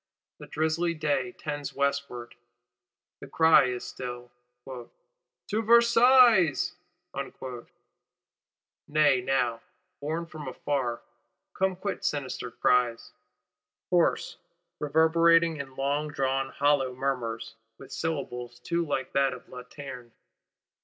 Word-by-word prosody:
The - - -10
drizzly 160 +2 0
day 140 -5 -1
tends 145 -2 -5
westward; 140 -4 -2 0.9
the - - -10
cry 160 0 +5
is 125 -1 -3
still: 120 -1 -7 0.4
'To 205 - -8
Versailles!' 235 - +5 2.2
Nay 150 -4 +3
now, 125 -3 0 0.4
borne 160 +4 -3
from 155 -3 -9
afar, 130 -2 -2 0.5
come 190 0 0
quite 200 +2 -4
sinister 135 -4 -2
cries; 120 0 +1 0.8
hoarse, - - +1 0.4
reverberating 165 +2 +4
in 135 -2 -7
longdrawn 135 -1 -1
hollow 140 -3 +1
murmurs, 120 -4 -3 0.2
with 135 0 -13
syllables 125 -5 -4
too 170 +7 -1
like 145 -4 -3
those 135 -1 +2
of 125 - -13
_Lanterne! 125 -1 -10
140 Hz, 95 wpm, -28 LUFS, 125-160 Hz, 2.2 s, cry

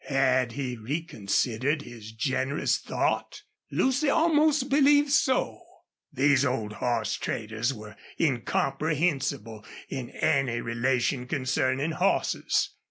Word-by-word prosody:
Had 130 -3 +2
he 130 -2 -4
reconsidered 130 +1 -1
his 115 -4 -10
generous 130 +5 0
thought? - - -2 0.3
Lucy 275 +3 +1
almost 305 -3 +3
believed 285 +1 +4
so. 260 -2 +1 0.5
These 140 -1 +3
old 115 -6 -1
horse 115 -2 -1
traders 110 +1 -2
were 105 -4 -10 0.2
incomprehensible 140 -3 -1 0.3
in 125 -3 -5
any 135 -6 0
relation 125 +2 -1
concerning 130 +2 0
horses. 185 +5 0
135 Hz, 100 wpm, -27 LUFS, 120-160 Hz, 0.5 s, believed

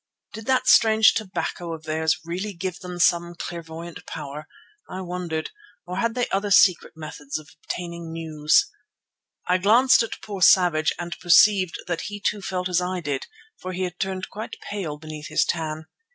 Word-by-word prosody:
Did 220 0 -8
that 260 -1 +2
strange 220 -1 +6
"tobacco" 185 -5 -3
of 160 - -13
theirs 160 +2 0
really 185 +5 -4
give 180 0 -4
them 180 -1 -7
some 175 0 +2
clairvoyant 170 0 -7
power, 150 0 -7 0.4
I 185 - -5
wondered, 175 -3 -4 0.3
or 180 +1 -5
had 230 +3 0
they 245 -1 0
other 200 +1 -1
secret 185 -2 +5
methods 150 -2 -6
of 155 0 -11 0.2
obtaining 170 -1 -5
news? 155 -2 +2 0.8
I 180 +1 +3
glanced 235 +8 +5
at 230 - -4
poor 200 -3 -6
Savage 170 -3 +5
and 175 0 -5
perceived 185 0 +5
that 175 -2 -2
he 205 0 -6
too 205 0 -1
felt 185 -1 -2
as 180 -1 +1
I 180 +1 -2
did, 145 -5 -3 0.3
for 185 - -6
he 185 +1 -2
had 180 0 -5
turned 190 -1 -3
quite 215 +2 -6
pale 175 -8 -4
beneath 155 0 -8
his - - +2
tan. 160 -1 -3
175 Hz, 170 wpm, -24 LUFS, 160-195 Hz, 0.8 s, strange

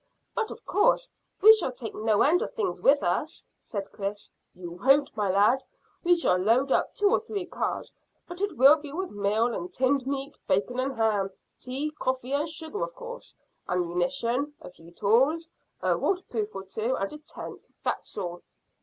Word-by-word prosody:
"But 445 -2 -1
of - - -10
course 410 +4 +2 0.3
we 440 +1 +11
shall 435 -11 0
take 240 -3 -7
no 215 -1 +2
end 340 +5 +4
of - - -4
things 440 -5 -2
with - - +5
us," - - -1
said 200 -3 -5
Chris. 205 +1 -5 0.2
"You 175 -1 -8
won't, 275 +2 +4
my 205 -3 0
lad. 210 +8 +4 0.4
We 350 0 +5
shall 185 - +2
load 240 +8 +2
up - - +1
two 410 0 +3
or - - +4
three 425 -4 -4
cars, - - -3 0.3
but 350 +1 -8
it 405 -6 -1
will 275 +4 +8
be 295 -2 -9
with 370 +5 -4
meal 210 +4 +1
and 355 +8 -5
tinned 265 -3 +1
meat, 275 +1 -4
bacon 225 +6 +1
and 265 +1 -1
ham. 210 -3 +2 0.3
Tea, 270 +4 -3
coffee, 260 -3 -2
and 295 +3 0
sugar, 320 +5 -5
of - - -3
course. - - -9 0.3
Ammunition, 230 - 0
a - - -11
few 165 -1 -16
tools, 270 - +2 0.3
a - - +3
waterproof 230 - -2
or 195 - -5
two, 220 +6 -2
and 195 +5 -3
a 300 - -8
tent. 305 - -9 0.2
That's - - -3
all." 175 -3 -4
260 Hz, 180 wpm, -27 LUFS, 210-325 Hz, 0.4 s, we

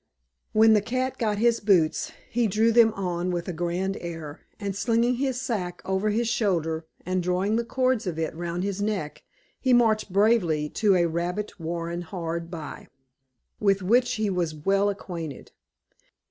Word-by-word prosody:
When 220 +1 +6
the 210 - +4
cat 255 +4 -2
got 215 -3 0
his 235 +2 +3
boots, 180 -7 +2 0.2
he 240 -1 +2
drew 220 +3 +3
them 230 -1 +6
on 180 -2 -2
with 175 -1 -2
a 180 - -3
grand 175 +3 -2
air, 165 -3 -7 0.2
and 200 -2 -3
slinging 235 +3 +1
his 260 -1 -1
sack 195 -9 -3
over 190 +2 0
his 225 +3 0
shoulder, 165 -8 0 0.2
and 185 +1 0
drawing 180 +4 0
the 235 - +1
cords 255 -2 0
of 170 -3 -3
it 160 -1 -2
round 170 +2 -3
his 200 0 -2
neck, 195 -8 -2 0.4
he 260 -2 +2
marched 220 -4 +3
bravely 185 -7 +2
to 205 +2 +2
a 175 -1 +3
rabbit 175 +5 -3
warren 170 +1 -3
hard 170 -1 -4
by, 165 -4 -8 0.7
with 195 -2 +2
which 245 +6 +3
he 215 -1 0
was 175 -5 -1
well 195 +6 +2
acquainted. 170 -7 -6
195 Hz, 165 wpm, -26 LUFS, 170-220 Hz, 0.7 s, When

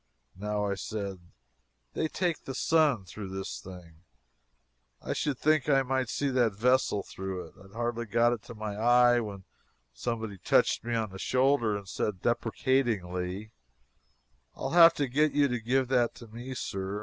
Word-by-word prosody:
Now, 105 +2 -2
I 100 - 0
said, 100 -1 -5 0.7
they 160 - 0
"take 175 0 -2
the 135 - -5
sun" 145 -10 +2
through 95 +2 -8
this 95 0 -5
thing; 90 -4 -12 1.0
I - - -3
should 145 -4 -1
think 155 -1 +2
I 135 -1 +4
might 130 -2 -1
see 140 +3 -1
that 120 -6 +2
vessel 125 -3 +2
through 95 -1 -6
it. 80 - -15
I - - -16
had 95 - -20
hardly 120 0 -2
got 120 +2 +3
it 115 - -5
to 120 - -9
my 105 -1 -5
eye 120 +2 +5
when 100 -4 -6 0.5
someone 110 - -4
touched - - +3
me 120 0 -2
on 110 -3 -1
the 95 - -9
shoulder 125 -4 +2
and 100 -1 -10
said 95 0 -3
deprecatingly: 110 -5 -1 1.0
"I'll 135 - -4
have 170 -1 +8
to 145 - 0
get 150 +4 +2
you 145 -1 +4
to 125 -1 -1
give 130 +3 +1
that 125 -3 +2
to 115 - -12
me, 120 +4 -7
Sir. 95 -2 -4
115 Hz, 175 wpm, -29 LUFS, 100-130 Hz, 1.0 s, have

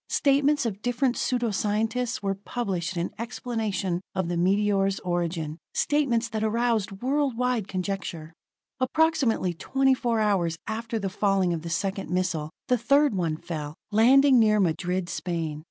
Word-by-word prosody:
Statements 285 0 +2
of 210 -3 -3
different 245 +1 0
pseudo 240 -3 0
scientists 225 +4 -1
were 195 0 +1
published 190 -4 -3
in 170 +1 -2
explanation 220 -7 -2
of 185 -3 -1
the 175 - -1
meteor's 195 +1 +2
origin, 170 -3 -2 0.2
statements 255 -6 +1
that 220 -1 -2
aroused 225 -2 +1
world 275 -2 +1
wide 250 -5 0
conjecture. 185 -4 -4 0.5
Approximately 260 - +2
twenty 270 +10 +2
four 235 -3 0
hours 185 -6 +1
after 225 +1 -3
the 200 -3 -2
falling 195 -3 +1
of 165 - -3
the 170 - -6
second 195 +3 -2
missile, 175 -4 -1 0.2
the 250 -1 +2
third 280 +3 +3
one 170 -5 -1
fell, 155 -3 -6 0.2
landing 260 +5 +6
near 215 -1 +4
Madrid, 180 0 0
Spain. 165 -3 -3
205 Hz, 145 wpm, -26 LUFS, 180-245 Hz, 0.5 s, landing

